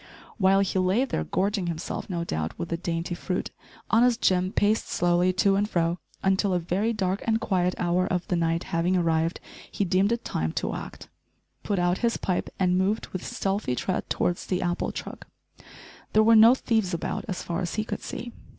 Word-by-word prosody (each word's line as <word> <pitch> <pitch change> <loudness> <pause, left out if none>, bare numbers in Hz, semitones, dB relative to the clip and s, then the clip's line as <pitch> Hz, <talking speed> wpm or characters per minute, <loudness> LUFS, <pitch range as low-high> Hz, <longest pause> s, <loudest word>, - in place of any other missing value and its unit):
While 195 0 +4
he 190 -1 0
lay 190 +8 +2
there - - -2
gorging 195 -1 0
himself, 170 +3 -4
no 170 -2 -2
doubt 80 - -3
with 170 - -4
the 170 - -1
dainty 170 0 -3
fruit, 180 +1 -3 0.4
honest 240 +1 +4
Jim 185 0 +2
paced 210 +2 +1
slowly 175 +1 +2
to 195 +1 +3
and 205 +1 +1
fro 170 -1 0 0.2
until, 190 0 +2
a - - +2
very 185 +7 0
dark 195 -3 -1
and 225 0 +2
quiet 185 -5 0
hour 180 +1 +1
of 180 -1 -2
the 180 - 0
night 165 0 0
having 175 +2 0
arrived, 165 -1 +1 0.3
he 200 - -1
deemed 190 +4 +2
it 235 0 -2
time 80 0 -2
to - - -2
act, - - -8 0.5
put 200 - -1
out 175 +1 +1
his 235 -1 +1
pipe, 180 -2 -2
and 180 -1 +2
moved 200 +4 0
with 185 - -5
stealthy 195 -9 -2
tread 185 +8 -2
towards 175 - -1
the 185 -1 -1
apple 175 0 -1
truck. - - -8 0.9
There 215 - +5
were 225 +1 +6
no 225 +3 +8
thieves 220 -8 0
about 165 - -3
as 190 -4 -4
far 170 +2 -3
as 175 - -3
he 215 - 0
could - - -5
see. 240 -1 -6
185 Hz, 195 wpm, -26 LUFS, 175-205 Hz, 0.9 s, no